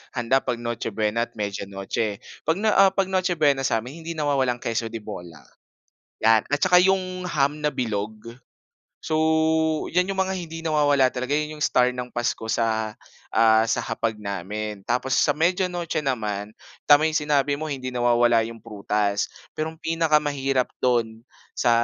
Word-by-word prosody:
handa 125 +2 +2
pag 125 -3 -2
Noche 120 -2 -4
Buena 110 +2 0
at 115 - -33
Media 100 -2 -3
Noche, 100 +2 -3
eh. - - -15 0.3
'Pag 165 +5 +1
na 220 - +4
ah, 195 -1 +5
'pag 190 -1 0
Noche 185 -1 +1
Buena 140 -4 +2
sa'min 125 +8 -3
hindi 170 - -4
nawawala 140 -5 +1
ang - - -15
queso 115 0 -1
de 115 -1 -7
bola, 85 -8 -9 0.8
yan 110 -1 +4
at 145 0 -1
saka 180 -1 +5
yung 185 -1 0
ham 150 -2 0
na 150 - +3
bilog. 110 0 -4 0.7
So, 160 0 +2
yan 180 +2 +2
yung 195 - -2
mga 190 0 +1
hindi 165 -2 -6
nawawala 145 -4 +3
talaga 130 +2 -4
yun 150 +1 0
yung - - +2
star 125 -2 +3
ng 125 0 -5
Pasko 120 -1 -2
sa 110 -1 0 0.4
ah, 110 0 +5
sa 115 - 0
hapag 110 -2 -2
namin. 105 +1 -5
Tapos 125 +2 -1
sa - - +4
Media 180 +4 +1
Noche 170 -3 -2
naman, 105 -6 -2 0.4
tama 145 +2 +7
yung 155 - -3
sinabi 145 -1 +1
mo 155 +1 -5
hindi 130 -2 -4
nawawala 120 -1 +3
yung 115 0 -7
prutas. 105 -2 -1 0.3
Pero 155 +1 -2
ang 160 - -17
pinakamahirap 145 -5 +1 0.2
dun 115 -2 0 0.3
sa 120 - +1
130 Hz, 175 wpm, -24 LUFS, 110-155 Hz, 0.8 s, tama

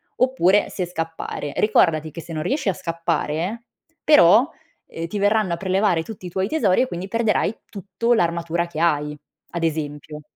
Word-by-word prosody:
oppure 210 -6 +3
se 185 - -3
scappare. 165 -3 -5
Ricordati 160 -7 +2
che 165 - -8
se 165 - -11
non 155 -1 -3
riesci 270 - 0
a - - +1
scappare, 170 +5 -2 0.4
però, 245 - +6 0.4
uhm, 165 - -6
ti 205 +4 -4
verranno 205 -2 +2
a - - -2
prelevare 190 -1 +1
tutti 190 +2 -9
i - - -5
tuoi 190 +2 -1
tesori 220 -10 +2
e 260 - +1
quindi 185 -3 -6
perderai 225 0 0
tutto 215 +4 -1
l'armatura 170 -2 0
che 165 -2 -7
hai." 150 -3 +1 0.3
Ad 170 -1 -4
esempio. 150 -1 -3
175 Hz, 170 wpm, -22 LUFS, 165-210 Hz, 0.4 s, però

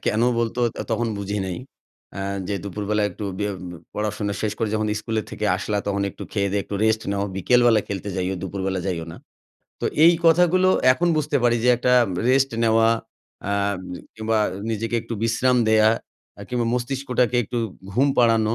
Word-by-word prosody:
কেনো 115 +3 +2
বলতো 115 +1 -1 0.3
তখন 115 +1 0
বুঝি 100 +1 -3
নাই। 90 -2 -4 0.6
আ - - -3 0.3
যে, 100 - -1
"দুপুরবেলা 105 +2 -2
একটু 105 +3 -7
বে 105 - -1 0.5
পড়াশোনা 105 -1 -2
শেষ 105 - 0
করে 115 -2 0
যখন 110 0 0
স্কুলে 110 0 -2
থেকে 110 - -4
আসলা 105 +2 -2
তখন 100 -1 0
একটু - - -11
খেয়ে-দেয়ে 100 -1 0
একটু - - -6
রেস্ট 110 0 +2
নাও। 100 0 -1
বিকেলবেলা 120 +3 +4
খেলতে 100 +1 -4
যাইও, 95 +1 -1
দুপুরবেলা 95 0 -3
যাইও 85 -4 -2
না।" - - -10 0.6
তো - - -3 0.2
এই 170 - +8
কথাগুলো 180 +2 +5 0.2
এখন 175 +7 0
বুঝতে 150 -1 0
পারি 120 -1 +3
যে - - +4
একটা 125 +1 +1 0.4
রেস্ট 135 +1 +3
নেওয়া 115 0 +4 0.6
আ - - +1 0.6
কিংবা 110 0 0 0.3
নিজেকে 115 +2 -2
একটু 115 - -5
বিশ্রাম 120 +3 +2
দেয়া, 110 0 +5 0.5
আ - - -8
কিংবা 120 -1 -1
মস্তিষ্কটাকে 125 -1 0
একটু 120 +4 -3 0.3
ঘুম 135 +7 +3
পাড়ানো 115 -2 +3
110 Hz, 165 wpm, -23 LUFS, 100-125 Hz, 0.6 s, এই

